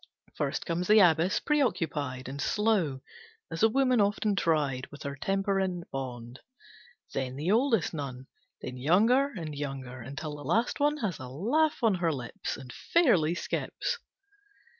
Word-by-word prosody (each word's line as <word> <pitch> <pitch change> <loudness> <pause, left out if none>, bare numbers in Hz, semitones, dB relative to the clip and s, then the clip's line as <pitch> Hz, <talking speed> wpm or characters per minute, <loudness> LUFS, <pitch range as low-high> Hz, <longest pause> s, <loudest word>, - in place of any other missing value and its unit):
First - - -2
comes 175 +1 -1
the 215 - +6
Abbess, 175 0 +4
preoccupied 165 - 0
And 140 +2 -5
slow, 195 -11 +1 0.5
as 165 - -4
a 225 - +6
woman 255 -1 +3
often 205 0 +1
tried, 145 -8 +1
With 145 - -11
her 140 -1 -4
temper 195 +6 0
in 185 -2 -1
bond. 125 -2 -6 0.7
Then 130 -1 -2
the 155 +7 -1
oldest 225 - +2
nun. 135 -4 -5 0.4
Then 125 0 -5
younger 215 - +4
and 165 - -6
younger, 135 -3 -5
until 140 +4 -6
the 145 - -9
last 220 - +1
one 295 +1 +2
Has 180 -7 -3
a 130 - -7
laugh 245 - +1
on 225 -3 +5
her 175 -3 +1
lips, 125 -5 -5
And 130 -3 -10
fairly 185 - +3
skips. 485 - -3
165 Hz, 155 wpm, -29 LUFS, 135-215 Hz, 0.7 s, the